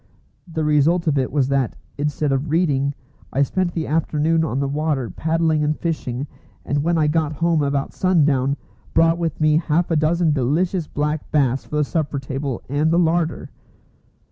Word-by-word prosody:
The 160 -1 -2
result 150 +3 +3
of 145 -3 +2
it 130 - -1
was 135 -2 +1
that, 135 -4 0 0.2
instead 145 0 -1
of 135 +3 -1
reading, 145 -4 +1 0.4
I 140 - +2
spent 180 +5 -1
the 160 -2 -2
afternoon 160 +1 +1
on 135 -4 -1
the 140 - 0
water 145 -4 -1
paddling 160 -1 +1
and 150 +1 0
fishing, 140 -6 -3 0.4
and 145 +6 0
when 170 +3 +1
I 155 - +3
got 155 0 +1
home 165 +1 +1
about 140 -1 -1
sundown, 145 -7 +2 0.4
brought 165 +1 +4
with 165 -1 -2
me 155 0 +4
half 165 +1 0
a - - +3
dozen 160 +1 +2
delicious 155 +6 0
black 150 +1 -2
bass 135 -4 +1
for - - -6
the 150 - +3
supper 150 -1 -2
table 135 -1 -4
and 145 +4 +1
the 165 - +2
larder. 165 -1 0
150 Hz, 175 wpm, -21 LUFS, 140-165 Hz, 0.4 s, brought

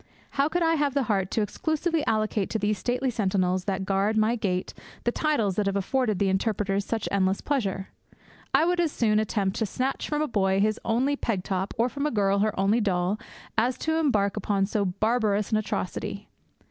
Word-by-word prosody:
How 280 +2 +1
could 350 +2 0
I 330 0 +3
have 290 -3 0
the 280 - +2
heart 195 -5 0
to 220 - 0
exclusively 315 - -1
allocate 215 -2 0
to - - -1
these 210 -1 0
stately 250 +4 0
sentinels 185 -4 0
that 190 -1 -1
guard 200 +3 +1
my 220 +2 +3
gate 185 -5 -2 0.3
the 240 - +1
titles 235 - 0
that 210 -1 +1
have 195 - 0
afforded 215 +2 0
the 200 - +1
interpreters 195 0 0
such 225 +1 -2
endless 190 -1 +2
pleasure? 200 -9 -2 0.6
I - - +4
would 355 +1 +1
as 335 -3 +2
soon 215 -5 +2
attempt 200 -3 -1
to 220 - 0
snatch 260 +7 -2
from 300 0 0
a - - -1
boy 190 -5 +1
his 215 +2 +1
only 255 +6 +1
peg 215 -9 -2
top, 190 0 -2
or 230 +2 +3
from 280 +3 -2
a - - +1
girl 200 -4 +2
her 210 -1 0
only 205 +4 +3
doll, 190 0 0 0.4
as 245 +2 +1
embark 270 -12 +2
upon 200 -1 +1
so 205 0 0
barbarous 210 +2 0
an 215 - +3
atrocity. 200 -1 -3
215 Hz, 200 wpm, -26 LUFS, 195-250 Hz, 0.6 s, I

